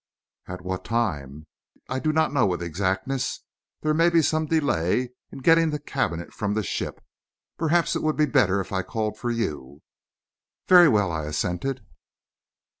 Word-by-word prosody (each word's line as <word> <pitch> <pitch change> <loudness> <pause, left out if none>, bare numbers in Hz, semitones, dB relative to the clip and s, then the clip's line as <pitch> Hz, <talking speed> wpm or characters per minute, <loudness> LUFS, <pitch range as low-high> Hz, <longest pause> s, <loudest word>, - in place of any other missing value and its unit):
"At 90 0 -7
what 95 0 -4
time?" 75 - -2 0.4
"I 130 - -2
do 155 +3 0
not 160 -1 +1
know 130 -7 +3
with 90 -2 -2
exactness. 95 - -2 0.4
There 155 0 +1
may 165 +2 +4
be 165 -1 +3
some 155 +1 +1
delay 130 - +1 0.2
in 135 - -10
getting 165 +1 +5
the 150 - -2
cabinet 85 - -3
from 105 0 -2
the 110 - 0
ship. - - -4 0.5
Perhaps 165 +1 +1
it - - -1
would 155 -1 0
be 155 - +4
better 105 -10 +2
if 95 - -5
I 95 - +1
called 110 +2 -3
for 120 - -2
you?" 75 - -4 0.8
"Very 175 -3 +8
well," 105 -6 +2
I 80 -2 -3
assented. 90 - -3
115 Hz, 165 wpm, -25 LUFS, 90-155 Hz, 0.8 s, Very